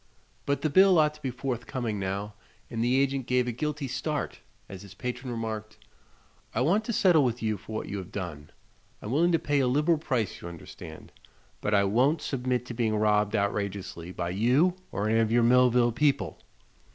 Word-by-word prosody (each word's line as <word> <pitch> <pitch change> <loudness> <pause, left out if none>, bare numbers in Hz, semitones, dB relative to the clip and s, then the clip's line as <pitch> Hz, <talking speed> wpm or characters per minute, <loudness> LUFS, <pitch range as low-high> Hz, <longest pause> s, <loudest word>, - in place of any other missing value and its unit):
But 140 0 0
the 155 - +2
bill 190 +2 +6
ought 150 -1 +4
to 150 - -17
be 135 - -2
forthcoming 120 -3 -3
now, 100 +2 -3 0.4
and 115 0 -1
the 125 +2 +3
agent 135 -2 0
gave 125 -1 +2
a - - 0
guilty 150 +3 -3
start 150 +4 -3 0.3
as 95 -1 -9
his 100 -2 -12
patron 125 +1 -5
remarked: 110 -2 -5 0.8
"I 115 - +1
want 195 +11 +2
to 235 - -2
settle 180 -8 +4
with 120 -2 -1
you 110 -1 +1
for 110 +2 -10
what - - -3
you 100 - -4
have 90 - -9
done. 80 -7 -6 0.5
I'm 105 - -6
willing 170 +6 +3
to 165 - +4
pay 145 -2 0
a 130 - +2
liberal 150 +5 +2
price, 125 - -2
you - - -7
understand, 80 -2 -10 0.5
but 105 0 +1
I 100 - +4
won't 130 +10 +2
submit 125 -2 -1
to 125 - -6
being 115 -2 0
robbed 105 0 +2
outrageously 100 -4 -2
by 85 -1 -3
you 125 - +3 0.2
or 105 - -1
any 110 +1 +3
of 110 -1 +1
your 120 0 +4
Millville 125 0 +4
people." 140 +4 0
120 Hz, 195 wpm, -28 LUFS, 105-140 Hz, 0.8 s, bill